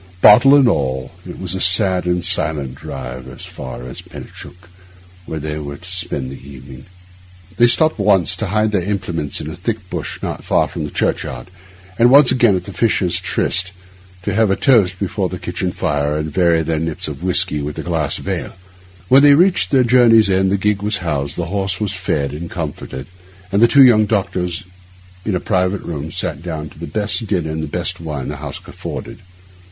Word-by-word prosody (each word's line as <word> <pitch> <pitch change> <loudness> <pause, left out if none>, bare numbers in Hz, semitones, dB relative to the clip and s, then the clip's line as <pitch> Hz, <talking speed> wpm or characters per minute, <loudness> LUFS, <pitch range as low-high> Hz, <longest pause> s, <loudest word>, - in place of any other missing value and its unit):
Bottle 120 +9 +8
and 140 -3 +5
all, 65 - -1 0.2
it - - -9
was 95 -2 -4
a 95 - -3
sad 90 -1 +2
and 90 0 0
silent 75 -4 -1
drive 65 -1 -8
as 65 - -10
far 65 -1 -8
as 65 - -8
Penicuik, 90 0 -12 0.6
where 80 - -4
they 75 +1 -4
were 70 -1 -7
to 90 +3 -10
spend 85 -8 -1
the 70 0 -11
evening. 65 -1 -12 0.7
They 120 - +6
stopped 155 +3 +3
once, 100 -4 +3
to 110 - -3
hide 110 +2 +1
their 100 -3 +1
implements 90 -6 -3
in 75 - -6
a 80 - -6
thick 105 -1 -4
bush - - -5
not - - -4
far - - +2
from 80 - -5
the - - -5
churchyard, 60 +1 -3 0.5
and 120 +1 +6
once 140 0 +7
again 120 -6 +4
at 90 - -2
the 100 - -9
Fisher's 95 -3 +1
Tryst, 90 +1 0 0.5
to 100 - -2
have 110 0 +2
a 95 - +2
toast 100 -9 +3
before 95 -1 -2
the 90 - -5
kitchen 90 +1 -3
fire 75 -2 -1
and 75 0 -3
vary 85 -2 +3
their 80 0 -1
nips 80 -1 -3
of 75 -1 -7
whisky 90 -4 +1
with 75 +1 -5
a - - -4
glass 80 -5 -1
of - - -10
ale. - - -3 0.5
When 135 +6 +6
they 145 0 +7
reached 180 +4 +3
their 135 -3 +4
journey's 115 -4 +5
end 95 0 +2
the 100 - +2
gig 105 0 0
was 105 +1 -1
housed, 70 -3 -2
the 85 - -2
horse 95 -2 -1
was 105 -3 -1
fed 75 -7 -2
and 85 +3 -6
comforted, 75 -5 -6 0.5
and 100 +2 +2
the 120 - +7
two 140 +2 +6
young 110 -4 +5
doctors 95 -3 -1 0.6
in 105 - 0
a - - 0
private 95 0 0
room 75 -1 -5
sat - - -3
down 80 -3 -5
to - - -16
the - - -6
best 105 +6 -2
dinner 85 -6 -1
and 80 0 -3
the 80 - -4
best - - -3
wine 75 -5 -5
the 75 - -5
house 75 -1 -6
afforded. - - -7
90 Hz, 205 wpm, -18 LUFS, 75-105 Hz, 0.7 s, Bottle